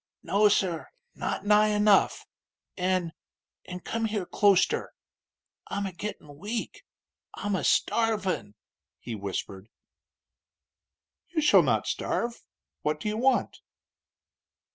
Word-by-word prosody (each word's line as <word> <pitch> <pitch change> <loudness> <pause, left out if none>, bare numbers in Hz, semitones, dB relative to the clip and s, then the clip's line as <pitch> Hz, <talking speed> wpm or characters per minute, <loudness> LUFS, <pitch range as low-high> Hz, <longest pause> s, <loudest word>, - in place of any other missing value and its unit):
"No, 210 +1 +4
sir; 185 -5 0 0.3
not - - -3
nigh 210 +1 +5
enough. 210 -1 +3 0.5
An' 180 -3 0 0.5
an' 180 0 -7
come 230 +4 -2
here 210 -4 -2
closter. 200 0 +2 0.7
I'm 200 0 -3
a 190 - -5
gittin' 165 -6 -7
weak 215 +5 -4 0.5
I'm 205 -1 -2
a - - -2
starvin'!" 205 - +1 0.4
he 120 - -7
whispered. 100 0 -5 1.6
"You 340 - -1
shall 300 - +7
not - - +1
starve. 235 0 -2 0.4
What 150 0 -1
do 210 - -2
you 210 - -2
want?" 260 +3 +1
200 Hz, 110 wpm, -27 LUFS, 175-215 Hz, 1.6 s, shall